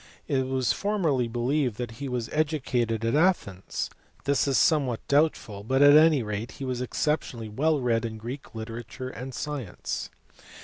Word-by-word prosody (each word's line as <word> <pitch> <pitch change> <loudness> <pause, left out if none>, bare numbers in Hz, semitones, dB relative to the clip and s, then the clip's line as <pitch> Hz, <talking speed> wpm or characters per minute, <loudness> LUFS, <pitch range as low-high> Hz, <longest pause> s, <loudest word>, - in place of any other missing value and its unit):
It 130 -2 +1
was 130 -2 +1
formerly 165 - 0
believed 120 +1 0
that 120 -2 -4
he 140 - -3
was 125 -2 -2
educated 125 -7 0
at 115 - +1
Athens: 150 - +1 0.4
this 140 0 +2
is 135 - +2
somewhat 140 -8 +2
doubtful, 140 -9 +1
but 130 +5 +3
at 145 0 +8
any 155 -4 +6
rate 105 +3 -4
he 135 - -6
was 125 -1 -2
exceptionally 125 -4 -1
well 150 +7 +1
read 120 -2 +1
in 110 -1 -4
Greek 120 +4 -8
literature 115 +3 -6
and 130 +1 -7
science. 130 -6 -4
130 Hz, 160 wpm, -27 LUFS, 115-145 Hz, 0.4 s, at